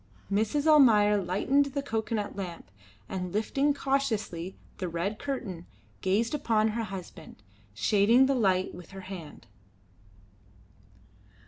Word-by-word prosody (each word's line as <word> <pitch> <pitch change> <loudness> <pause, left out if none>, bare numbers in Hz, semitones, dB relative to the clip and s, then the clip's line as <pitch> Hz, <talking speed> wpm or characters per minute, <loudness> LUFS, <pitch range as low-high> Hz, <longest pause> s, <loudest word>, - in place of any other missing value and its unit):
Mrs. 220 +9 +1
Almayer 230 -10 +6
lighted 270 +10 +1
the 280 - -1
cocoanut 220 -4 -2
lamp, 180 - -7 0.4
and 180 -2 -4
lifting 270 +8 +1
cautiously 230 -11 -2 0.2
the 185 -2 -2
red 175 +6 -3
curtain, 200 -11 -5 0.3
gazed 210 +6 +1
upon 220 -6 +2
her 225 +1 -2
husband, 185 - -9 0.3
shading 215 - +4
the 275 - +2
light 190 -7 +1
with 175 -1 -11
her - - -6
hand. 180 -9 -9
210 Hz, 115 wpm, -28 LUFS, 185-260 Hz, 0.4 s, Almayer